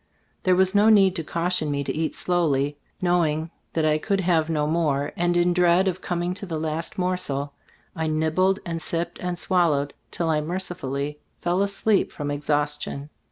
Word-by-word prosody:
There 185 Hz, -1 st, +3 dB
was 190 Hz, +1 st, +3 dB
no 210 Hz, +2 st, +5 dB
need 195 Hz, -4 st, +5 dB
to 165 Hz, -, -2 dB
caution 170 Hz, 0 st, 0 dB
me 140 Hz, 0 st, -1 dB
to -, -, -3 dB
eat 160 Hz, 0 st, -1 dB
slowly; 145 Hz, -5 st, +1 dB, 0.3 s
knowing 165 Hz, -3 st, +1 dB, 0.2 s
that 160 Hz, -1 st, +1 dB
I 155 Hz, 0 st, +3 dB
could 195 Hz, +3 st, 0 dB
have 165 Hz, -3 st, +2 dB
no 150 Hz, -2 st, +1 dB
more, 150 Hz, -3 st, 0 dB
and 175 Hz, 0 st, +1 dB
in 175 Hz, 0 st, +3 dB
dread 180 Hz, +1 st, +4 dB
of 185 Hz, 0 st, -1 dB
coming 175 Hz, 0 st, -1 dB
to 200 Hz, +1 st, -6 dB
the 165 Hz, -3 st, -3 dB
last 160 Hz, +1 st, -3 dB
morsel, 180 Hz, -7 st, -1 dB, 0.4 s
I 160 Hz, -1 st, -1 dB
nibbled 160 Hz, +5 st, +2 dB
and 165 Hz, -2 st, -3 dB
sipped 170 Hz, +1 st, -3 dB
and 180 Hz, -1 st, -3 dB
swallowed 155 Hz, -6 st, +1 dB, 0.2 s
till 165 Hz, -2 st, -1 dB
I 150 Hz, -1 st, +1 dB
mercifully 150 Hz, -4 st, -3 dB, 0.2 s
fell 175 Hz, +2 st, +1 dB
asleep 200 Hz, +1 st, +1 dB
from 145 Hz, -1 st, -4 dB
exhaustion. 145 Hz, 0 st, -2 dB
165 Hz, 175 wpm, -24 LUFS, 150-180 Hz, 0.4 s, no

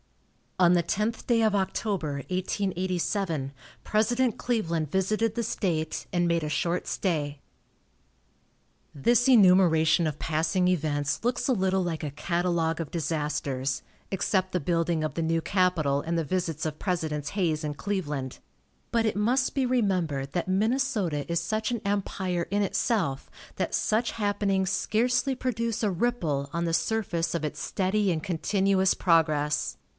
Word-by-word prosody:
On 180 Hz, -1 st, +6 dB
the 175 Hz, -1 st, +3 dB
tenth 215 Hz, +7 st, -2 dB
day 235 Hz, -2 st, +3 dB
of 215 Hz, -2 st, +3 dB
October, 190 Hz, -4 st, -1 dB, 0.2 s
1887, 185 Hz, -4 st, -1 dB, 0.3 s
President 235 Hz, +2 st, +1 dB
Cleveland 170 Hz, -, -1 dB
visited 215 Hz, +4 st, +1 dB
the 235 Hz, -, -1 dB
state, 170 Hz, -8 st, -2 dB
and 175 Hz, -1 st, +2 dB
made 170 Hz, -1 st, +1 dB
a 150 Hz, -, -2 dB
short 170 Hz, +3 st, -1 dB
stay. 150 Hz, -6 st, -1 dB, 1.5 s
This 235 Hz, -, +3 dB
enumeration 180 Hz, -8 st, +5 dB
of 150 Hz, -2 st, -3 dB
passing 165 Hz, +3 st, +1 dB
events 150 Hz, -4 st, 0 dB
looks 245 Hz, 0 st, 0 dB
a 265 Hz, -, +3 dB
little 190 Hz, -3 st, +1 dB
like 165 Hz, -3 st, -3 dB
a 150 Hz, -, -3 dB
catalogue 170 Hz, +1 st, 0 dB
of 165 Hz, -4 st, -4 dB
disasters 145 Hz, -5 st, -2 dB, 0.3 s
(except 190 Hz, -1 st, 0 dB
the 180 Hz, -, +1 dB
building 165 Hz, 0 st, 0 dB
of 155 Hz, -, -2 dB
the 165 Hz, -, -1 dB
new 165 Hz, 0 st, +1 dB
capitol 165 Hz, -7 st, +1 dB
and 170 Hz, +2 st, -2 dB
the 165 Hz, -, +1 dB
visits 165 Hz, -2 st, -2 dB
of 155 Hz, -1 st, -3 dB
Presidents 160 Hz, -6 st, -2 dB
Hayes 170 Hz, -6 st, 0 dB
and 150 Hz, -1 st, -4 dB
Cleveland), 150 Hz, -11 st, -3 dB, 0.5 s
but 230 Hz, -1 st, +2 dB
it 220 Hz, -, 0 dB
must 245 Hz, +5 st, +1 dB
be 270 Hz, -2 st, +2 dB
remembered 180 Hz, -, 0 dB
that 175 Hz, -, -1 dB
Minnesota 205 Hz, -, 0 dB
is 170 Hz, -, +2 dB
such 220 Hz, +2 st, -2 dB
an 235 Hz, -3 st, -2 dB
empire 190 Hz, -3 st, -1 dB
in 205 Hz, +2 st, +1 dB
itself, 195 Hz, -, -1 dB, 0.3 s
that -, -, -1 dB
such 225 Hz, +2 st, +1 dB
happenings 200 Hz, -3 st, 0 dB
scarcely 245 Hz, +7 st, +1 dB
produce 230 Hz, -3 st, -2 dB
a 210 Hz, -, +2 dB
ripple 170 Hz, -, -1 dB
on 170 Hz, 0 st, -1 dB
the 165 Hz, -, -1 dB
surface 175 Hz, -4 st, 0 dB
of 160 Hz, -2 st, -1 dB
its 150 Hz, -, -4 dB
steady 195 Hz, +1 st, 0 dB
and 160 Hz, -2 st, -2 dB
continuous 190 Hz, +2 st, +2 dB
progress. 155 Hz, -4 st, +1 dB
180 Hz, 150 wpm, -27 LUFS, 160-210 Hz, 1.5 s, On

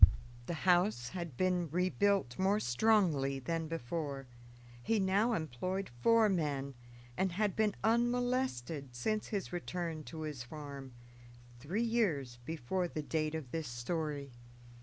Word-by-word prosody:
The 170 Hz, -, -1 dB
house 175 Hz, -, +3 dB
had 170 Hz, -8 st, -5 dB
been 180 Hz, -1 st, +1 dB
rebuilt 185 Hz, -, +1 dB
more 195 Hz, +2 st, +3 dB
strongly 145 Hz, -, +3 dB
than 165 Hz, +4 st, -2 dB
before. 145 Hz, -2 st, -3 dB, 0.6 s
He 225 Hz, -, +2 dB
now 200 Hz, +5 st, +3 dB
employed 185 Hz, -, -2 dB
four 230 Hz, -, +6 dB
men, 145 Hz, -7 st, 0 dB, 0.4 s
and 190 Hz, -1 st, +1 dB
had 205 Hz, +1 st, +1 dB
been 215 Hz, -2 st, +2 dB
unmolested 235 Hz, -, +1 dB
since 215 Hz, -, -1 dB
his 200 Hz, -4 st, -3 dB
return 170 Hz, -2 st, -3 dB
to 160 Hz, -1 st, -7 dB
his 150 Hz, -5 st, -4 dB
farm, 140 Hz, -1 st, -8 dB, 0.6 s
three 175 Hz, -, -1 dB
years 165 Hz, -, +1 dB
before 165 Hz, +5 st, -1 dB
the 155 Hz, -2 st, -4 dB
date 155 Hz, 0 st, -1 dB
of 145 Hz, -6 st, -5 dB
this 160 Hz, -3 st, -2 dB
story. 140 Hz, +3 st, -3 dB
165 Hz, 130 wpm, -34 LUFS, 140-195 Hz, 0.6 s, four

